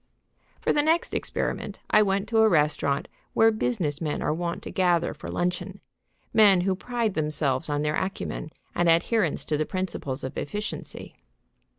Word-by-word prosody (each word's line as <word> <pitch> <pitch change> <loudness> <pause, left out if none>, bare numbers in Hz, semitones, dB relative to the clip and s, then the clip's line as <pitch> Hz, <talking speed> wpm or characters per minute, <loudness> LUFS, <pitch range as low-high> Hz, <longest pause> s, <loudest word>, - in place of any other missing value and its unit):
For - - +1
the 295 - +3
next 325 +3 +1
experiment - - -2
I 215 - +6
went 200 0 +1
to 225 -1 +2
a 220 0 +6
restaurant 150 -4 +1 0.3
where 225 0 +5
business 190 - -1
men 150 -2 -1
are - - +1
wont 170 +1 -3
to - - -6
gather 175 -2 +2
for - - -9
luncheon, 180 0 -2 0.5
men 200 -4 +6
who 190 +1 +1
pride 235 0 -2
themselves 150 -4 -1
on 145 0 0
their 150 0 0
acumen 190 -4 -3 0.2
and 175 -1 +2
adherence 170 +1 +2
to 150 - 0
the 155 - 0
principles 175 -8 -3
of 130 - -4
efficiency. 210 +8 -6
175 Hz, 165 wpm, -26 LUFS, 150-210 Hz, 0.5 s, I